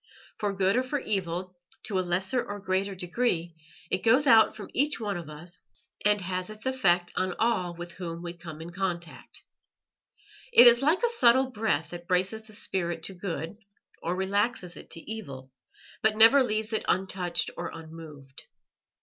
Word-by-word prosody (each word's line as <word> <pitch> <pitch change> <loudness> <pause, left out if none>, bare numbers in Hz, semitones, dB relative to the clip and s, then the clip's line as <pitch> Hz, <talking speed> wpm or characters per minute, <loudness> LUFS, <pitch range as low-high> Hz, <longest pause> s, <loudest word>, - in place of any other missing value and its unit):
For 205 -1 0
good 195 0 +1
or - - +4
for 260 +3 -2
evil, 185 -5 -2 0.2
to 195 -3 -1
a - - +2
lesser 190 +7 0
or 205 - -6
a - - -8
greater 190 +1 -1
degree, 175 -2 -1 0.4
it 185 - 0
goes 255 +6 +4
out 225 -4 +6
from - - -9
each 295 0 +1
one 205 -3 -2
of 170 -3 -6
us, 170 +4 -12 0.4
and 210 0 +4
has 185 +1 -3
its 215 +2 -9
effect 180 -10 +2
on 185 0 -1
all 200 -7 0
with 175 0 -8
whom 170 -1 -6
we 170 -1 -5
come 165 -2 -9
in 170 +1 -8
contact. 175 -2 -5 1.1
It 250 - +9
is 240 +1 +8
like 315 - +2
a 475 - +4
subtle 260 - +4
breath 210 -10 -1
that 175 0 -8
braces 185 +4 +1
the 220 0 -15
spirit 175 -4 -2
to 195 - -6
good, 175 0 -5 0.4
or 175 +2 -2
relaxes 190 -1 -1
it - - -12
to - - -5
evil, 140 -13 -7 0.5
but 215 0 +2
never 230 +6 +8
leaves 220 -2 -1
it 220 - 0
untouched 180 -2 0
or 175 - -4
unmoved. 155 -4 -10
190 Hz, 175 wpm, -28 LUFS, 175-220 Hz, 1.1 s, It